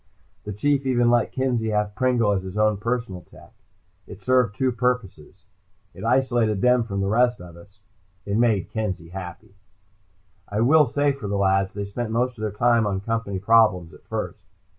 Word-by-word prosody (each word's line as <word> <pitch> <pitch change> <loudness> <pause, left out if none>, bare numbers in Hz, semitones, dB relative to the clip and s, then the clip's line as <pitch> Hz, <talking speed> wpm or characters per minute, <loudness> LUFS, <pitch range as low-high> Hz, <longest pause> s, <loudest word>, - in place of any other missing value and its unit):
The 105 - -5
Chief 140 +7 0
even 120 -2 +3
let 120 -1 +2
Kenzie 125 -4 -1
have 105 -1 -1
Pringle 120 -2 +1
as 100 -2 0
his 95 +2 -8
own 105 -1 +2
personal 115 -4 -3
tech. - - -18 0.5
It 100 - -11
served 125 -1 +1
two 130 +2 +1
purposes. 115 -8 -3 0.5
It - - -11
isolated 120 -4 +1
them 125 -1 +3
from 100 -3 -3
the 95 - -1
rest 120 +3 +2
of 85 -1 -12
us. 95 +4 -17 0.5
It 100 - -2
made 110 -5 +1
Kenzie 100 -7 -4
happy. 90 +1 -9 1.0
I 105 +2 -1
will 150 +4 +5
say 145 0 +1
for 135 -7 -6
the 100 0 -2
lads, 95 -1 +1
they 100 -1 -3
spent 110 +3 -5
most 125 +3 -1
of - - -7
their 110 - -1
time 115 +1 +2
on 95 -2 -2
Company 115 -2 -3
problems, 100 -4 +3
at - - -17
first. - - -5
110 Hz, 185 wpm, -23 LUFS, 100-120 Hz, 1.0 s, will